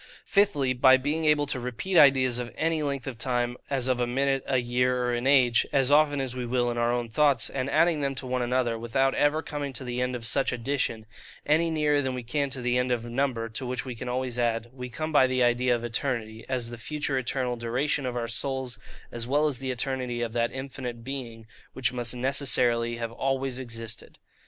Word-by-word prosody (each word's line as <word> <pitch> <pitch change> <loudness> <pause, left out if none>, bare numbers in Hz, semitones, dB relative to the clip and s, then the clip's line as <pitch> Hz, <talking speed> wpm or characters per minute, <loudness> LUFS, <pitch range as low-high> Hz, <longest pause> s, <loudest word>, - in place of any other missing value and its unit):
Fifthly, 150 -11 +2
by 130 +1 +6
being 150 +4 -1
able 150 -1 +4
to 135 -2 -2
repeat 125 +10 -4
ideas 130 -5 +5
of 120 -1 -5
any 160 0 0
length 140 -3 -2
of 125 -4 -6
time, 120 -1 0
as 130 -2 0
of 130 -1 +1
a 120 - +1
minute, 135 +2 +1
a 130 - +2
year, 125 +1 +1
or 125 0 0
an 120 +2 -1
age, 125 -4 +5
as 135 -1 +3
often 145 -1 +4
as 130 -2 -3
we 125 - -3
will 120 0 0
in 120 - -4
our 120 0 +2
own 120 -1 -1
thoughts, 135 +1 +2
and 130 0 -2
adding 165 0 +3
them 140 -1 -1
one 130 -1 -2
to - - +1
another, 120 -2 0
without 135 +4 +1
ever 150 +2 +2
coming 145 -2 -4
to 130 +1 -6
the 125 0 -3
end 125 0 -1
of 120 -2 -5
such 135 +3 +1
addition, 120 -2 -2 0.4
any 160 +3 +3
nearer 150 -2 +2
than 130 -2 -2
we 125 - -5
can 140 +4 -1
to 130 -1 -4
the 125 0 +2
end 125 0 0
of 120 -1 -1
number, 120 -1 -1
to 115 +3 -5
which 125 0 -3
we 130 - -5
can 125 +2 -6
always 125 -1 -2
add; 115 -1 0
we 125 -1 -7
come 155 +6 -4
by 135 -4 +5
the 130 -1 +1
idea 120 +1 +3
of 120 - -5
ETERNITY, 115 -2 -3
as 125 -3 -1
the 120 - -8
future 145 +1 -2
eternal 125 -1 -2
duration 125 +5 -1
of 125 -1 -3
our 115 -1 -2
souls, 130 +2 -2 0.3
as 120 0 -4
well 145 +4 +2
as 135 -5 -2
the 135 -1 -4
eternity 125 -1 -2
of 115 -1 -4
that 120 0 0
infinite 130 -3 -6
Being 120 -4 -6 0.3
which 125 -3 0
must 120 -1 -1
necessarily 120 -2 +2
have 115 -1 -4
always 135 +1 -2
existed. 115 -3 -7
125 Hz, 225 wpm, -27 LUFS, 120-135 Hz, 0.4 s, by